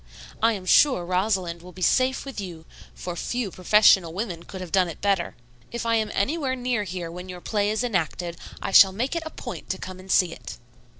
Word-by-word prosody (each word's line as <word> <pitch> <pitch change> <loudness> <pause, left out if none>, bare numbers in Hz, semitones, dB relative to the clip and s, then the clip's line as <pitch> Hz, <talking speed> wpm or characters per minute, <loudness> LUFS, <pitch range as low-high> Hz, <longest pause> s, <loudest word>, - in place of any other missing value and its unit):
"I 225 +1 +4
am 190 -3 -6
sure 220 -3 +4
Rosalind 180 -2 0
will 180 +1 -12
be 185 - -6
safe 260 +6 +2
with 270 -6 -6
you, 170 -4 -8 0.3
for 175 -1 -6
few 240 +2 -3
professional 185 -3 +4
women 185 -3 -4
could 190 +2 -9
have 180 -3 -7
done 185 -3 +2
better. 195 -4 0 0.4
If 235 0 -4
I 230 - +1
am 215 -1 -1
anywhere 270 - 0
near 245 -4 -1
here 175 -2 -5
when 180 +2 -8
your 180 -1 -7
play 205 +2 0
is 220 +3 0
enacted, 175 -5 -2 0.3
I - - -2
shall 190 0 +8
make 250 - -2
it 335 - -1
a - - -5
point 245 -5 -8
to 190 - -1
come 185 0 -8
and 185 0 -8
see 175 -3 +3
it." - - -9
190 Hz, 215 wpm, -25 LUFS, 180-230 Hz, 0.4 s, shall